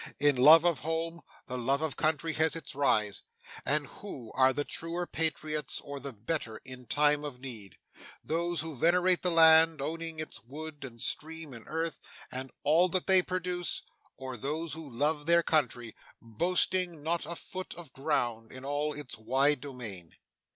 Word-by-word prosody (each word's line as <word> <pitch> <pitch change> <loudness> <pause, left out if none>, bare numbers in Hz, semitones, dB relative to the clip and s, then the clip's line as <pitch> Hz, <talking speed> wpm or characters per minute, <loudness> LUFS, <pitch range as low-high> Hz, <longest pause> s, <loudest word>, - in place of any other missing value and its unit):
In 145 -1 +4
love 155 +6 +8
of 170 -4 +2
home, 165 +2 -3 0.2
the 125 0 -4
love 135 +5 +1
of 155 -6 -2
country 160 +1 0
has 160 +1 +2
its 165 - -6
rise; 110 -7 +1 0.4
and 150 +1 +1
who 130 - -9
are 130 0 +4
the 145 +2 -1
truer 170 +2 -3
patriots 155 -3 -1
or 140 -1 -7
the 140 +1 -6
better 115 0 -3
in 130 -1 -10
time 150 0 +3
of 140 -4 -6
need 115 -8 -6 0.5
those 170 +1 -1
who 160 -2 -5
venerate 180 +6 +3
the 180 - +1
land, 160 -1 +7
owning 165 +3 -4
its 155 - -7
wood, 150 +4 -8
and 120 -3 -9
stream, 160 -2 -2
and 115 -2 -11
earth, 165 0 -3 0.3
and 130 +1 -5
all 165 +5 +4
that 185 +1 0
they 190 -1 +6
produce? 180 -1 -2 0.3
or 130 -1 -6
those 155 +7 -3
who 160 -2 -7
love 145 +4 0
their 170 0 +5
country, 125 -8 0 0.2
boasting 175 - +1
not 170 +2 -1
a 170 - -4
foot 185 +2 -7
of 165 -6 -10
ground 120 -6 -1
in 130 +1 -10
all 145 +2 -1
its 145 -6 -7
wide 135 +5 +2
domain! 115 - -7
150 Hz, 170 wpm, -30 LUFS, 130-165 Hz, 0.5 s, love